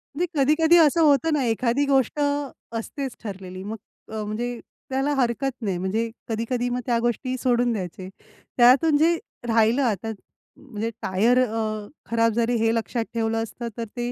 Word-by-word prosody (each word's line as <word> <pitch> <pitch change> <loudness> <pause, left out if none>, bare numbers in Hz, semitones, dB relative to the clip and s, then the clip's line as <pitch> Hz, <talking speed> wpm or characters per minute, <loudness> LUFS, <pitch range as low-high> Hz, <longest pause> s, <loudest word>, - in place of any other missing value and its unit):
म्हणजे 345 +5 +1
कधी-कधी 320 +5 +5
असं 330 0 +5
होतं 310 +1 +4
ना 290 -3 +1
एखादी 240 +4 +1
गोष्ट 270 0 +1
असतेच 280 -2 -3
ठरलेली 190 -2 -7
मग 210 +3 -5 0.4
अ, 220 -1 -3
म्हणजे 235 +3 -3 0.3
त्याला 270 +2 0
हरकत 265 +1 0
नाही. 195 -5 -1
म्हणजे 210 +6 -1 0.2
कधी-कधी 235 +2 -1
मग 245 0 -1
त्या 240 -2 +1
गोष्टीही 240 +2 -1
सोडून 245 -1 +2
द्यायचे. 185 -2 -5 0.5
त्यातून 265 +6 +6
जे 330 +3 +4 0.3
राहिलं 230 +3 +3
आता 225 -2 -1 0.5
म्हणजे 220 -1 -5
टायर 220 +7 +3
अ, 215 -2 -3 0.2
खराब 230 0 +3
जरी 235 +2 +1
हे 225 0 +2
लक्षात 230 +1 -2
ठेवलं 225 -1 0
असतं. 235 +1 -6
तर 230 - -3
ते 240 0 -2
235 Hz, 155 wpm, -24 LUFS, 225-270 Hz, 0.5 s, त्यातून